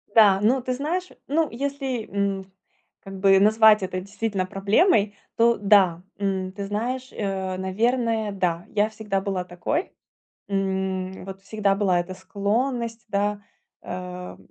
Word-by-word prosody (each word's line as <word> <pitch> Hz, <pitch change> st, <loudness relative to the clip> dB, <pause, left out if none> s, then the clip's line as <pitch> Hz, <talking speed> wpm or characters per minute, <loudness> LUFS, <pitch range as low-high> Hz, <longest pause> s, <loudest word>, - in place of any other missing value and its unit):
Да, 200 Hz, -3 st, +7 dB
ну, 250 Hz, +5 st, +3 dB
ты 255 Hz, +1 st, -2 dB
знаешь, 335 Hz, +8 st, -2 dB, 0.2 s
ну, 310 Hz, +2 st, +1 dB
если, 270 Hz, -2 st, -3 dB
м, 195 Hz, -1 st, -2 dB, 0.5 s
как 195 Hz, -1 st, -9 dB
бы, 195 Hz, 0 st, +6 dB
назвать 215 Hz, 0 st, +6 dB
это 185 Hz, 0 st, -2 dB
действительно 200 Hz, -1 st, -2 dB
проблемой, 205 Hz, -, +2 dB, 0.2 s
то 235 Hz, 0 st, +4 dB
да. 195 Hz, -4 st, +4 dB, 0.2 s
М, 190 Hz, -2 st, -1 dB
ты 200 Hz, 0 st, -5 dB
знаешь, 250 Hz, +6 st, -3 dB
э, 190 Hz, -2 st, -3 dB
наверное, 220 Hz, +3 st, 0 dB
да, 175 Hz, -3 st, -1 dB
я 210 Hz, +1 st, +1 dB
всегда 210 Hz, -3 st, -2 dB
была 190 Hz, -2 st, -2 dB
такой. 235 Hz, -, -2 dB, 0.6 s
М, 190 Hz, -1 st, -2 dB
вот, 195 Hz, 0 st, -8 dB
всегда 200 Hz, -1 st, +1 dB
была 190 Hz, -3 st, +2 dB
эта 185 Hz, +2 st, -6 dB
склонность, 230 Hz, +5 st, -2 dB
да, 205 Hz, 0 st, 0 dB, 0.4 s
э, 180 Hz, 0 st, -7 dB
200 Hz, 135 wpm, -24 LUFS, 190-225 Hz, 0.6 s, Да